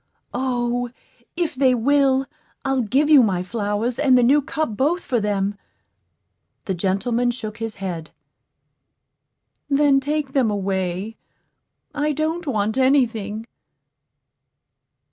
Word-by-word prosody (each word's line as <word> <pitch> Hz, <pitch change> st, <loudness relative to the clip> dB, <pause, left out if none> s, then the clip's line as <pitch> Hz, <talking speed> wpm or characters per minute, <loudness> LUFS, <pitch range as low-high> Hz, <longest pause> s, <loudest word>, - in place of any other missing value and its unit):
O, 245 Hz, -1 st, -1 dB, 0.5 s
if 345 Hz, -3 st, 0 dB
they 260 Hz, -1 st, +3 dB
will, 270 Hz, +2 st, +3 dB, 0.4 s
I'll 270 Hz, -1 st, +1 dB
give 265 Hz, +7 st, +1 dB
you 300 Hz, -3 st, +8 dB
my 190 Hz, -6 st, +1 dB
flowers 210 Hz, +3 st, -2 dB
and 270 Hz, -3 st, +5 dB
the 245 Hz, -, +4 dB
new 280 Hz, +5 st, +5 dB
cup 280 Hz, -4 st, -3 dB
both 310 Hz, -, +1 dB
for 245 Hz, -4 st, 0 dB
them." 205 Hz, -1 st, -1 dB, 1.1 s
The 190 Hz, -, -1 dB
gentleman 200 Hz, +7 st, 0 dB
shook 225 Hz, -3 st, -5 dB
his 225 Hz, -1 st, -4 dB
head. 175 Hz, -5 st, -5 dB, 1.6 s
"Then 280 Hz, -1 st, +4 dB
take 290 Hz, 0 st, -2 dB
them 260 Hz, -5 st, +2 dB
away. 195 Hz, +1 st, -2 dB, 0.8 s
I 295 Hz, +1 st, 0 dB
don't 315 Hz, +3 st, -2 dB
want 220 Hz, -1 st, 0 dB
any 265 Hz, 0 st, +5 dB
thing." 220 Hz, -1 st, -6 dB
245 Hz, 120 wpm, -22 LUFS, 210-275 Hz, 1.6 s, you